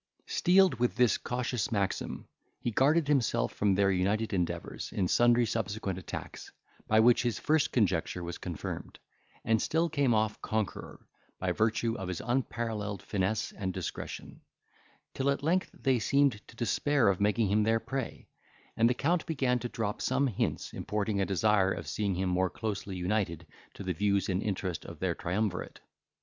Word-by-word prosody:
Steeled 185 -5 +4
with 125 0 +1
this 125 -2 +3
cautious 125 -3 -2
maxim, 100 -3 -2 0.3
he 120 - -2
guarded 145 +7 +3
himself 130 - +1
from 100 -2 +2
their 100 0 +3
united 100 +4 0
endeavours, 90 -3 -3
in 95 - 0
sundry 120 +3 +4
subsequent 105 -4 -2
attacks, 90 - -7 0.4
by 110 - +4
which 120 +2 +6
his 120 -4 -1
first 155 0 +2
conjecture 90 -5 +1
was 85 0 -5
confirmed, - - -6 0.5
and 110 -1 +3
still 165 +2 +1
came 140 -6 +2
off 110 0 0
conqueror, 110 -2 -3 0.3
by 95 -1 -1
virtue 110 +4 +1
of 95 - -4
his 90 -3 -3
unparalleled 115 -4 -2
finesse 100 +2 -1
and 95 -2 -4
discretion; 95 -3 -6 0.7
till 135 +1 0
at 140 0 0
length 180 +4 +1
they 130 -3 +1
seemed 135 -1 +2
to - - -15
despair 120 +4 +2
of 100 -1 +2
making 105 0 +2
him 105 +2 +3
their 110 +1 +2
prey, 135 0 -5 0.5
and 115 +1 +4
the 125 - +1
count 165 +6 +1
began 130 -6 +1
to 120 - -4
drop 110 -3 -3
some 130 +2 +2
hints, 120 -8 -2
importing 105 -1 -1
a 95 - 0
desire 100 0 +3
of 85 - -4
seeing 95 +7 -1
him 95 +1 -1
more 90 +1 +1
closely 100 -2 -4
united 90 -3 -1 0.3
to - - -7
the 95 -1 -1
views 100 +2 +1
and 95 +1 0
interest 95 -5 -2
of - - -9
their - - 0
triumvirate. 95 +1 -2
110 Hz, 165 wpm, -30 LUFS, 95-125 Hz, 0.7 s, which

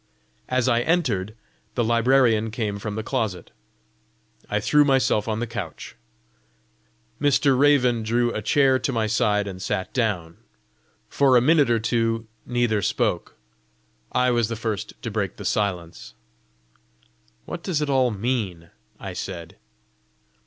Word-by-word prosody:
As 130 -1 +1
I 120 -2 +3
entered, 120 - 0 0.4
the 120 - +1
librarian 115 -1 +3
came 105 -2 -3
from 105 0 -5
the 110 - -3
closet. 105 -5 -3 1.0
I 105 - 0
threw 150 +8 +4
myself 135 -6 +2
on 110 -1 -1
a - - -1
couch. 105 -8 -7 1.3
Mr. 145 -1 +3
Raven 125 -4 +3
drew 120 +2 0
a 110 - -3
chair 135 +4 +3
to 140 - -1
my 115 -3 0
side 105 -1 +1
and 95 -2 -7
sat 95 0 -3
down. 95 -9 -1 0.7
For 135 -3 +4
a - - +7
minute 145 +1 +4
or 120 - +3
two 115 0 0 0.2
neither 120 -4 +1
spoke. - - -1 0.8
I 125 0 +2
was 120 -2 +2
the 115 - -4
first 110 -2 -4
to 115 - -4
break 100 -3 -2
the - - -9
silence. 90 -5 -2 1.3
"What 170 - -6
does 170 -4 -1
it 150 - -1
all 130 -2 +3
mean?" 100 -6 -3 0.3
I - - -6
said. 85 -4 -7
115 Hz, 140 wpm, -24 LUFS, 105-130 Hz, 1.3 s, a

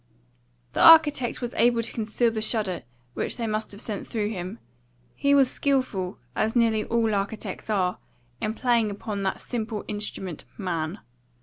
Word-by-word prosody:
The - - 0
architect 295 -8 +7
was 240 - -3
able 235 0 +3
to 230 - -3
conceal 225 +1 +1
the 220 -1 -3
shudder 215 -5 0 0.3
which - - -2
they 235 - -2
must 215 0 -2
have 200 +1 -7
sent 210 -4 -4
through 210 -2 -1
him. 190 0 -5 0.6
He 280 0 +3
was 275 -2 +6
skilful, 255 -10 0 0.2
as 220 +2 0
nearly 225 -2 +3
all 230 -2 +1
architects 200 +1 -3
are, 185 -4 +1 0.4
in 215 +1 -1
playing 235 -4 +2
upon 205 0 -4
that 190 -1 -1
simple 220 -3 -4
instrument 200 -5 -5
Man. 175 -1 -3
220 Hz, 160 wpm, -26 LUFS, 200-235 Hz, 0.6 s, architect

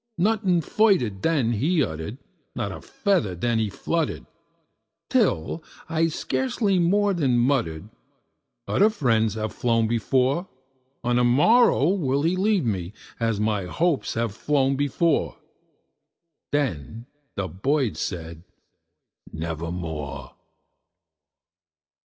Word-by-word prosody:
Nothing 190 -2 +2
further 195 - +2
then 120 +4 0
he 150 - +2
uttered 80 +5 -5 0.4
not - - -2
a - - -8
feather 175 - 0
then 115 +6 0
he 110 -2 0
fluttered 165 - -2 0.9
Till 165 - +1 0.2
I 165 0 +1
scarcely 165 - 0
more 200 +4 +3
than 135 -8 +1
muttered, 120 - 0 0.8
"Other 210 +3 +4
friends 115 - +1
have 110 0 -3
flown 115 -2 +1
before 130 - +1 0.6
On 120 0 +1
the 125 - +3
morrow 145 - +4
he 195 - -3
will 135 0 +1
leave 185 +2 +1
me, 95 -4 -2 0.3
as 115 -3 0
my 105 -3 0
hopes 160 - 0
have 115 -2 -1
flown 135 +2 +1
before." 145 +3 0 1.1
Then 115 - -2 0.3
the 100 -2 -2
bird 130 +6 0
said, 85 -3 -5 0.9
"Nevermore." 80 -4 -5
125 Hz, 110 wpm, -24 LUFS, 100-165 Hz, 1.1 s, Other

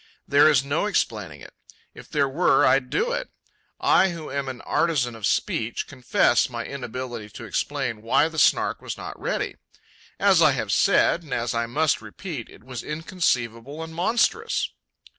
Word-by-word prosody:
There 145 +2 +6
is 140 -3 +3
no 150 +8 0
explaining 100 - -2
it; - - -12 0.4
if - - -13
there 140 -2 +1
were, 150 +7 +3
I'd 135 -2 +3
do 480 +3 0
it. - - -3 0.5
I, 190 - +4
who 165 -3 -7
am 140 -1 -2
an 125 -2 -7
artisan 140 -8 0
of 110 -3 -2
speech, 115 +1 -1
confess 130 -3 +2
my - - -5
inability 125 -4 -6
to - - -10
explain 110 -2 -2
why 115 +7 +3
the 160 -1 -4
Snark - - +3
was - - -6
not - - -7
ready. - - -2 0.6
As 195 -4 +5
I 155 -3 +6
have 110 -6 -2
said, 195 - +3
and 155 - -5
as 120 -1 -1
I 115 0 -1
must 150 +5 +1
repeat, 155 - -7
it - - -16
was 125 -2 -6
inconceivable 150 -4 -2
and 160 0 -9
monstrous. 235 - +1
140 Hz, 170 wpm, -24 LUFS, 120-165 Hz, 0.6 s, There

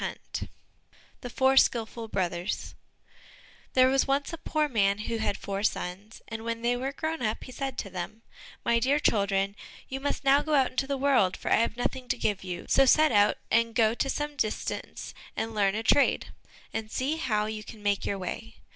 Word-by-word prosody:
129 - - -5 0.7
The 245 - -6
Four 265 +2 +3
Skilful 230 -2 +2
Brothers 180 -1 -2 1.0
There 255 0 +6
was 270 +1 +2
once 280 +3 0
a 330 - -5
poor 305 -1 0
man 200 -6 +2
who 225 +2 -3
had 210 -2 -1
four 195 0 -4
sons, 205 +1 -3
and 225 0 -6
when 230 0 -3
they 240 +1 +2
were 260 +2 -2
grown 315 +2 -3
up, 220 -1 -1
he - - -10
said 270 +1 -4
to 195 - -4
them, 190 +5 -6 0.4
"My 235 0 +3
dear 275 +5 +2
children, 200 -5 +1 0.3
you 270 - -4
must 285 +1 -2
now 275 +1 +5
go 310 0 0
out 265 -2 +3
into 270 +1 -1
the 280 0 -1
world, 260 -10 +3
for - - -4
I - - +6
have 230 0 0
nothing 250 +1 -2
to 250 - 0
give 205 -4 -1
you, 180 -2 -5
so 270 0 +5
set 310 +3 +5
out, 205 -1 +4
and 230 0 +2
go 225 -1 +4
to 270 +3 -1
some 295 +1 -2
distance 215 -5 -3 0.2
and 225 0 -2
learn 200 -2 +2
a 220 - -2
trade, 280 +5 +3 0.4
and 220 -1 -3
see 275 +6 -1
how 215 -9 0
you 215 0 -5
can 210 0 -11
make 205 -1 +1
your 200 - -1
way." 180 - -6
230 Hz, 200 wpm, -28 LUFS, 205-270 Hz, 1.0 s, There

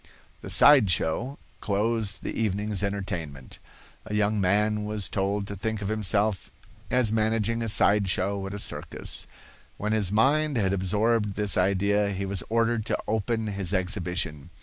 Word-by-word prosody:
The - - -9
"side 140 -9 +7
show" 115 - -1 0.2
closed 105 0 -1
the - - -4
evening's 105 -2 0
entertainment. 90 - -5 0.5
A 105 - -4
young 105 0 +1
man 105 +3 +1
was 105 -2 -3
told 100 +1 -1
to 100 - -6
think 110 +2 -3
of 100 -1 -4
himself 105 -1 0 0.4
as 125 -4 +2
managing 110 +1 0
a 115 - -1
side 100 -1 +2
show 95 +2 -1
at 95 - -7
a - - -4
circus. 100 - -3 0.5
When 105 +1 -3
his 105 -4 +1
mind 140 +6 +2
had 100 -3 +1
absorbed 105 +2 0
this 105 -2 +2
idea 100 +2 +1
he 95 +1 -3
was 95 -1 -1
ordered 115 0 +1
to - - 0
open 110 +1 -1
his 100 -2 -1
exhibition. 90 -5 -2
105 Hz, 155 wpm, -26 LUFS, 95-110 Hz, 0.5 s, side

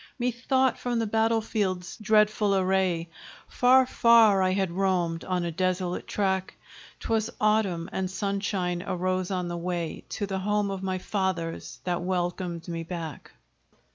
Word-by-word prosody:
Methought 255 +1 +1
from 245 -1 -1
the 225 - +1
battle 225 +1 +2
field's 190 -5 -2
dreadful 215 -1 +3
array, 185 -3 +1 0.4
Far, 255 +1 +5
far 230 -5 +5
I 185 - +3
had 190 -1 0
roamed 175 -3 0
on 180 -2 -1
a 170 - -2
desolate 180 +1 -1
track: 190 -2 -1 0.5
'Twas 220 0 0
Autumn, 210 -6 +1
and 190 -1 -2
sunshine 195 -3 -2
arose 185 0 -1
on 180 -2 -2
the 175 0 -4
way 170 -1 -3
To 205 - -3
the 195 -1 -3
home 205 +1 0
of 195 -1 -4
my 190 -1 -1
fathers, 185 -4 -3
that 175 -1 -1
welcomed 175 -1 -2
me 165 -1 -3
back. 165 -2 -7
190 Hz, 145 wpm, -27 LUFS, 180-210 Hz, 0.5 s, Far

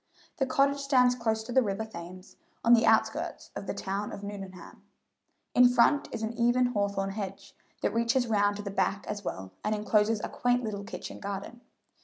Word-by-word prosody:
The 270 -4 +1
cottage 275 +2 +2
stands 255 -3 +4
close 220 -2 -1
to 235 - -8
the 260 - +5
river 210 -1 -2
Thames, 185 -2 -10 0.3
on 235 - +7
the 230 -1 +5
outskirts 225 - +1
of - - -6
the - - -2
town 200 +2 -3
of 200 - -8
Nuneham. 195 -3 -8 0.7
In 250 0 +7
front 250 +4 +3
is 225 - -4
an 220 +1 -2
even 240 +2 +3
hawthorn 200 -2 -1
hedge, 195 -1 -6 0.3
that - - +1
reaches 235 +2 +2
round 205 -3 +2
to 205 - -6
the 200 - -4
back 195 0 0
as 205 -1 -5
well, 95 - -5
and 215 0 0
encloses 210 +1 +2
a - - -1
quaint 245 0 0
little 205 -3 -4
kitchen 210 - -7
garden. 200 +4 -6
220 Hz, 190 wpm, -29 LUFS, 200-240 Hz, 0.7 s, on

